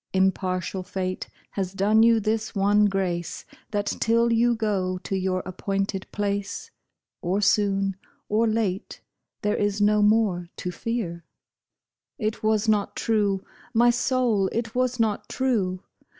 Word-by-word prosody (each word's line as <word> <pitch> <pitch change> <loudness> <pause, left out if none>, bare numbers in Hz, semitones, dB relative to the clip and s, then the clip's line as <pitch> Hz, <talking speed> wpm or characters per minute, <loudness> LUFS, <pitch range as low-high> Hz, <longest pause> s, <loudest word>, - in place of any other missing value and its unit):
Impartial 190 -1 0
fate 185 0 -4 0.2
has 190 -2 -3
done 210 +3 +3
you 230 0 +6
this 220 +1 -1
one 205 +1 +4
grace, 185 -4 -2 0.2
That 205 -1 -1
till 230 +2 +2
you 235 +1 +3
go 195 -5 -1
to 195 - -4
your 185 -1 0
appointed 195 +1 -2
place. 200 -1 -3 0.5
Or 185 +3 0
soon 195 -1 +2 0.3
or 220 +2 +2
late, 215 -4 -1 0.4
there 210 0 +1
is 205 0 0
no 210 +1 +4
more 205 -5 +2
to 180 - -3
fear." 180 -4 -3 0.9
It 215 -4 -2
was 215 0 +1
not 210 -2 +1
true, 205 -4 +1 0.3
my 240 +1 +6
soul! 240 -5 +1
it 230 -1 -2
was 255 0 0
not 220 -2 0
true! 200 -9 0
205 Hz, 135 wpm, -25 LUFS, 190-225 Hz, 0.9 s, you